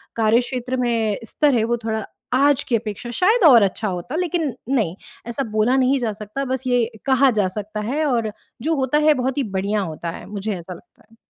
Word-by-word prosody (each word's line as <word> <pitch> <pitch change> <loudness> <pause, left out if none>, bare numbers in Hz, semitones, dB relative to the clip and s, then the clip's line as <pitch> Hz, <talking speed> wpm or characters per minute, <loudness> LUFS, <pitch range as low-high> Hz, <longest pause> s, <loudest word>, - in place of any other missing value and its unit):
कार्यक्षेत्र 245 +3 +1
में 230 -4 0
स्तर 290 +3 +2
है, 225 - +2
वो 235 +1 0
थोड़ा 220 -1 -2 0.3
आज 280 +1 +3
की 240 - 0
अपेक्षा 225 +2 -6
शायद 410 - +3
और 245 -8 +8
अच्छा 200 +2 -1
होता। 180 - -4
लेकिन 335 -5 -1 0.2
नहीं, 220 -11 +1 0.3
ऐसा 240 +4 -2
बोला 215 +4 +2
नहीं 265 +1 +3
जा 230 -3 -1
सकता, 215 +6 -5
बस 260 0 -2
ये 245 -2 +3 0.2
कहा 270 0 +4
जा 185 - +1
सकता 210 +1 -4
है 305 +3 0
और 235 -6 0 0.3
जो 320 +2 +1
होता 270 +1 +1
है 305 - +7
बहुत 260 0 -2
ही - - +1
बढ़िया 205 +2 0
होता 170 -2 -5
है, - - -9
मुझे 210 +1 -3
ऐसा 180 +2 -8
लगता 225 +7 -18
है। - - -20
240 Hz, 205 wpm, -21 LUFS, 215-270 Hz, 0.3 s, और